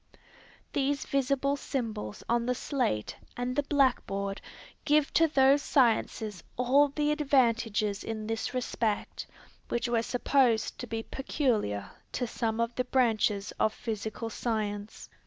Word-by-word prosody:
These 280 0 0
visible 275 +1 +1
symbols 230 -7 -4
on 235 0 +1
the 250 - +1
slate 245 - -1 0.2
and 245 +1 -2
the 290 - +3
blackboard 240 -9 0 0.4
give 300 -1 +2
to 330 - +5
those 275 -1 +4
sciences 225 -7 +1
all 265 +4 +4
the 295 +1 0
advantages 230 -8 +1
in 220 -1 -4
this 225 +1 -2
respect 230 -4 -2 0.4
which 235 0 0
were 235 -1 +2
supposed 245 -1 +1
to 245 - -5
be 225 0 -3
peculiar 230 - -1 0.2
to 245 - -1
some 225 -1 -2
of 230 +1 0
the 250 - -1
branches 220 -5 +1
of 215 - +2
physical 220 +1 -4
science. 210 -2 -3
240 Hz, 130 wpm, -29 LUFS, 220-270 Hz, 0.4 s, to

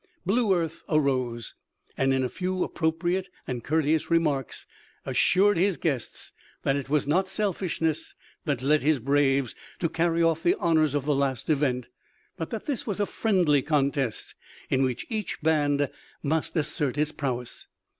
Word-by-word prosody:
Blue 215 +2 +2
Earth 165 -2 -2
arose, 130 -6 0 0.4
and 135 0 +2
in 130 0 +2
a - - +1
few 185 +6 -2
appropriate 175 +3 -1 0.2
and 125 -3 -4
courteous 155 +1 +1
remarks 150 -6 0 0.4
assured 200 +1 +3
his 190 +1 +2
guests 135 -8 -3 0.3
that 135 - +2
it 140 -1 -4
was 150 0 +2
not 180 +7 +2
selfishness 185 -5 -1 0.3
that 140 -5 -1
led 150 +2 +3
his 150 +1 +3
braves 135 0 +2 0.2
to 165 - 0
carry 165 +1 +1
off 165 -1 +2
the 175 - +3
honors 160 -5 +2
of 140 -2 -1
the 150 - +2
last 135 0 0
event, 135 -4 +1 0.5
but 165 - -5
that 225 - -5
this 275 -5 -3
was 205 -2 -2
a 205 - +2
friendly 180 -11 +2
contest 140 -4 0 0.4
in 130 - +3
which 130 -2 -1
each 215 -5 -3
band 145 -2 +2 0.4
must 160 +4 -1
assert 145 -3 0
its 150 +1 +1
prowess. 125 -5 -4
155 Hz, 155 wpm, -27 LUFS, 135-170 Hz, 0.5 s, assured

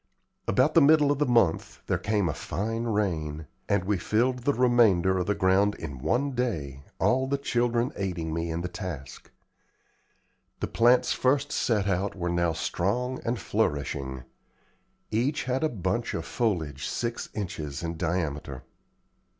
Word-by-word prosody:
About 130 +10 +3
the 165 - +6
middle 150 0 +5
of 145 - 0
the 150 - +2
month 115 -9 +1
there - - 0
came 105 -3 0
a 75 - -1
fine 115 - -3
rain, 80 -9 -1 0.2
and 100 -2 +2
we 100 -1 0
filled 125 +7 +1
the 140 +4 +1
remainder 110 -7 +4
of 90 - -2
the 105 - +1
ground 100 +2 +3
in 70 -5 -7
one 125 - 0
day, 80 - -2 0.2
all 130 +1 +2
the 140 +1 0
children 120 -2 0
aiding 90 -5 -3
me 85 +1 -2
in 80 +1 -2
the 90 - -2
task. 85 - -7 1.3
The - - -1
plants 125 +2 +3
first 140 +3 +1
set 105 -4 +1
out 95 +1 0
were 90 -2 -2
now 85 -1 +1
strong 125 +10 -1
and 120 +1 -1
flourishing. 70 -6 -2 0.9
Each 130 +7 0
had 130 +3 -1
a 155 - +2
bunch 100 - -2
of 80 - -3
foliage 90 - -1
six 120 0 -3
inches 80 -8 -4
in 85 0 -3
diameter. 80 -5 -3
100 Hz, 155 wpm, -27 LUFS, 85-120 Hz, 1.3 s, the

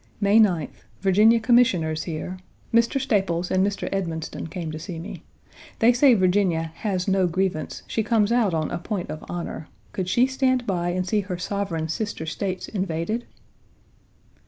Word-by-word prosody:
May 205 +1 +4
9th. 175 -9 +1 0.2
Virginia 210 +4 +5
Commissioners 220 -10 +3
here. 180 +2 -5 0.3
Mr. 235 +3 +3
Staples 195 -9 0
and 185 0 +3
Mr. 200 0 -1
Edmonston 165 -3 -3
came 165 -1 -5
to 155 - -6
see 170 +1 -6
me. 170 +5 -7 0.6
They 235 +2 +5
say 250 0 +5
Virginia 180 -4 +1
"has 190 -3 -2
no 190 -1 +3
grievance; 180 -2 -2
she 225 - -1
comes 220 -1 +2
out 225 -7 +2
on 155 -1 -1
a - - -2
point 180 +1 -4
of 155 - -7
honor; 170 -3 -5 0.2
could 185 -2 -3
she 245 +6 +4
stand 260 -1 +1
by 175 -4 -1
and 185 +1 -1
see 210 +2 +2
her 190 -3 -4
sovereign 180 -3 -2
sister 205 -1 -3
States 185 +3 -3
invaded?" 195 +4 -2
190 Hz, 160 wpm, -24 LUFS, 170-215 Hz, 0.6 s, Virginia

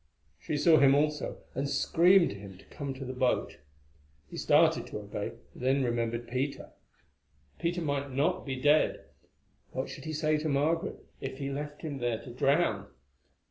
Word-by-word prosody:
She 150 - -3
saw 155 +2 +6
him 140 -1 +6
also, 150 +1 -1
and 140 +2 -2
screamed 170 +6 +4
to - - -7
him 100 -2 -10
to - - -18
come 140 -2 -6
to 135 +1 -7
the 130 - -5
boat. 125 -1 0 0.7
He - - -7
started - - +3
to - - -6
obey, - - -5 0.2
then 135 +2 +1
remembered 120 -1 -1
Peter. 130 +4 -3 0.9
Peter 175 0 -1
might 140 -2 -1
not 160 +8 +1
be 135 -2 -3
dead; 145 +4 +2 0.7
what - - -3
should - - -9
he 155 - -4
say 155 0 +1
to 155 +1 -2
Margaret 160 +6 0
if 135 0 -5
he 140 0 -3
left 145 +2 -6
him 145 -4 -4
there 120 -2 -1
to 125 - -9
drown? 125 - +1
140 Hz, 170 wpm, -30 LUFS, 130-155 Hz, 0.9 s, saw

